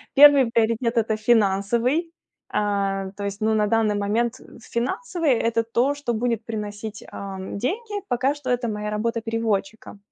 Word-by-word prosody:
Первый 285 -2 +8
приоритет- 230 +1 +1
это 220 -1 +1
финансовый. 230 - +2 0.4
А 195 -2 -1
то 200 - -5
есть, 200 +1 -4
ну, 220 0 +2
на 210 -1 +2
данный 220 -1 +2
момент, 220 +4 0
э, - - -15
финансовый- 325 - -1
это 230 -1 +1
то, 245 +5 +1
что 265 -5 -3
будет 230 -1 -1
приносить, 210 -1 -6
ам, 190 -1 -6
деньги. 410 - -3
Пока 260 +3 +1
что 275 -3 -6
это 245 -1 0
моя 210 -1 -3
работа 230 +2 -1
переводчика. 220 -2 -2
225 Hz, 155 wpm, -23 LUFS, 210-245 Hz, 0.4 s, Первый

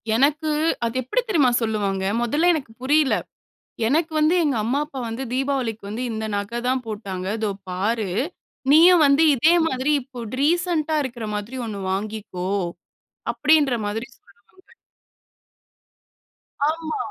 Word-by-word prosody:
எனக்கு, 300 +5 +2 0.3
அது 230 +1 -3
எப்படி 380 - 0
தெரியுமா 300 - +3
சொல்லுவாங்க? 205 -4 -1 0.2
முதல்ல 295 +9 +2
எனக்கு 280 -8 -4
புரியல. 285 +1 +3 0.7
"எனக்கு 315 +6 +1
வந்து, 310 +3 +3
எங்க 290 -4 +1
அம்மா 250 +6 0
அப்பா 280 -3 -8
வந்து, 230 +4 -4
தீபாவளிக்கு 260 -5 -1
வந்து 225 +4 -4
இந்த 220 0 -3
நகை 205 +4 -3
தான் 255 0 0
போட்டாங்க. 200 -4 -5
இதோ 215 -2 -1 0.2
பாரு! 205 +3 -1 0.6
நீயும் 335 +2 +7
வந்து 280 +3 +5
இதே 310 +7 +4
மாதிரி 260 0 0
இப்போ 255 -1 -11 0.2
ரீசென்ட்டா 325 0 +1
இருக்கிற 240 -4 -5
மாதிரி 210 +5 -5
ஒண்ணு 210 -3 -5
வாங்கிக்கோ" 200 -2 -4 0.8
அப்படின்ற 300 -4 +3
மாதிரி 225 +4 -4
சொல்லுவாங்க. 200 0 -26 2.3
ஆமா. 320 +3 -3
255 Hz, 125 wpm, -23 LUFS, 220-305 Hz, 2.3 s, நீயும்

